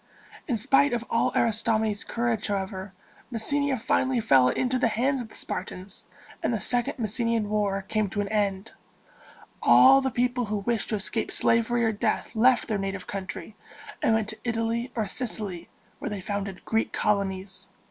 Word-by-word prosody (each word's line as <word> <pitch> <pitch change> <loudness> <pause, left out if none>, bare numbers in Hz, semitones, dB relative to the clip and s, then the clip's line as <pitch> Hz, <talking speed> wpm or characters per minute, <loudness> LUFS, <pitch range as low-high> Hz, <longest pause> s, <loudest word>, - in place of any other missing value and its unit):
In 245 - 0
spite 275 +5 +3
of 235 0 -2
all 230 - +2
Aristomenes' 220 -2 +1
courage, 230 -2 -1
however, 195 -1 -3 0.4
Messenia 280 +4 0
finally 260 +2 +1
fell 135 - +5
into 255 - 0
the 245 - +3
hands 255 +4 0
of 230 - -8
the - - -15
Spartans, 185 +1 -5 0.4
and - - 0
the 225 - 0
Second 245 +3 0
Messenian 230 -1 0
War 200 -2 0
came 215 0 -1
to 205 +2 -2
an 200 - -3
end. 205 -1 -1 0.9
All 270 +1 +7
the 265 - 0
people 245 0 0
who 210 0 -2
wished 220 +2 -2
to 220 - 0
escape 215 +2 -2
slavery 235 +1 +2
or 225 - +3
death 220 +2 -2
left 250 +3 +4
their 215 -3 -1
native 195 -1 -4
country, 195 +2 -6 0.5
and 225 - +3
went 220 -1 -1
to 215 - -7
Italy 230 +1 -1
or 220 -3 0
Sicily, 205 -7 -3 0.3
where - - -4
they 205 -2 -4
founded 195 -1 -5
Greek 225 0 0
colonies. 195 -2 -1
220 Hz, 170 wpm, -26 LUFS, 200-240 Hz, 0.9 s, All